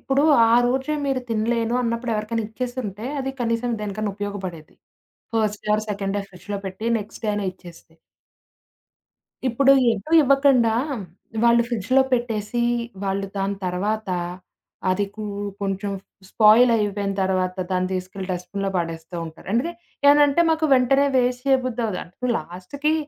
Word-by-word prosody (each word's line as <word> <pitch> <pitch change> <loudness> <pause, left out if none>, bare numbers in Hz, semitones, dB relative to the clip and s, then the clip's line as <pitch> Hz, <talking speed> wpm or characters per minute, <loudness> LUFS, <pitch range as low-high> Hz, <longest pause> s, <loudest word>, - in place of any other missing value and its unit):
ఇప్పుడు 270 +1 +1 0.3
ఆ - - +6
రోజే 265 +4 0
మీరు 270 -2 0
తినలేను 230 +1 0
అన్నప్పుడు 235 0 -1
ఎవరికైనా 215 +1 -2
ఇచ్చేసుంటే, 235 -2 -5
అది 265 0 -2
కనీసం 230 +1 0
దేనికైనా 210 0 -3
ఉపయోగపడేది. 190 -6 -6 0.6
First 210 -2 0
day - - -3
or 215 - -2
second 200 -1 -3
day 200 - -1
ఫ్రిడ్జ్‌లో 195 +2 -6
పెట్టి, 190 +4 -6
నెక్స్ట్ 205 +3 -10
డే - - +1
అయిన 205 -1 -2
ఇచ్చేస్తే. 170 -3 -15 1.5
ఇప్పుడు 270 +3 +5 0.2
ఎటు 225 +8 -6
ఇవ్వకండా 275 -4 +4 0.2
హ్మ్, 230 -8 -4 0.4
వాళ్ళు 235 0 +5
ఫ్రిడ్జ్‌లో 245 +4 +2
పెట్టేసి, 235 -1 0 0.4
వాళ్ళు 195 0 -1
దాని 195 0 -1
తర్వాత, 205 +4 -2 0.8
అది 200 +2 +1
కు 215 -1 -6 0.4
కొంచెం 195 +1 -2 0.4
స్పాయిల్ 220 +4 +6
అయిపోయిన 205 -2 -1
తర్వాత 185 -1 0 0.2
దాన్ని 185 0 0
తీసుకెళ్లి, 185 +1 -5
డస్ట్‌బిన్‌లో 190 +2 -3
పడేస్తూ 165 0 -5
ఉంటారు. 160 +1 -13
అందుకే 270 +9 +1 0.3
ఏమన్నంటే 290 +2 +6
"మాకు 320 0 +2
వెంటనే 270 +2 +4
వేస్ట్ 250 0 +1
చేయబుద్ధి 255 -3 +1
అవ్వదు." 210 +4 -3
లాస్ట్‌కి, 185 - -3
215 Hz, 135 wpm, -23 LUFS, 195-250 Hz, 1.5 s, ఆ